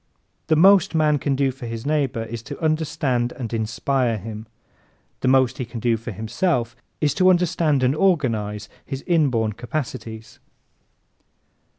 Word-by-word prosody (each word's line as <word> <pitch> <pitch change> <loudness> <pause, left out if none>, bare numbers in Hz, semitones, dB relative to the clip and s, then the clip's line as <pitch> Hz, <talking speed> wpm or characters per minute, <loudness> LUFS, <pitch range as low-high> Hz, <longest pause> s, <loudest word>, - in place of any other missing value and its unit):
The 155 - +3
most 190 +2 +5
man 150 -2 +3
can 140 -1 0
do 135 0 +1
for 125 -2 -9
his 115 0 -6
neighbor 140 -6 0
is 115 0 -6
to - - -6
understand 150 -6 0
and 120 -3 -6
inspire 115 +2 0
him. 110 +2 -8 0.7
The - - -1
most 130 +1 +3
he - - -1
can 115 0 -7
do 115 0 +2
for 115 +1 -7
himself 120 - -1 0.2
is 150 -2 +1
to 185 -1 +4
understand 165 -6 +2
and 130 +3 +2
organize 115 - 0 0.2
his 135 0 -6
inborn 125 -11 +2
capacities. 115 -3 -6
130 Hz, 150 wpm, -22 LUFS, 115-155 Hz, 0.7 s, most